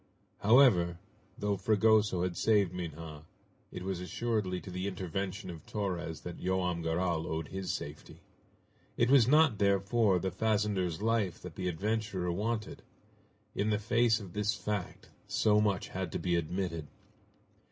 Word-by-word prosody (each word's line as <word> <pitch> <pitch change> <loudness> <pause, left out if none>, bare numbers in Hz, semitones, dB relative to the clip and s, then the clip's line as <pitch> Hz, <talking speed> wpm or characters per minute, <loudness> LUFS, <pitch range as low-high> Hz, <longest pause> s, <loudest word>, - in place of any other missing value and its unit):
However, 100 -7 +5 0.4
though 100 -1 -1
Fragoso 105 -2 +3
had 90 -1 -2
saved 100 -2 +2
Minha, 80 -3 -6 0.5
it 90 - -6
was 95 -1 -3
assuredly 95 0 -2
to 95 - -9
the 90 +2 -3
intervention 95 +1 -4
of 80 -3 -10
Torres 90 -6 -3
that 90 -1 -7
Joam 90 -2 0
Garral 80 0 -1
owed 80 -1 -3
his 95 0 -3
safety. - - -7 0.8
It 120 +2 +3
was 130 -5 +6
not, 145 -5 +5
therefore, 100 +1 +3
the 95 +2 -2
fazender's 105 -5 0
life 110 -5 +1
that 90 -2 -7
the 90 +3 -4
adventurer 100 0 -1
wanted. 105 +4 -3 0.7
In 105 - 0
the 105 - +2
face 115 +1 +2
of 95 -5 -10
this 105 +2 0
fact, 105 -4 -4 0.2
so 105 -1 +3
much 100 -3 0
had 95 -3 -4
to - - 0
be 90 -1 0
admitted. 85 -1 -2
95 Hz, 145 wpm, -31 LUFS, 90-105 Hz, 0.8 s, was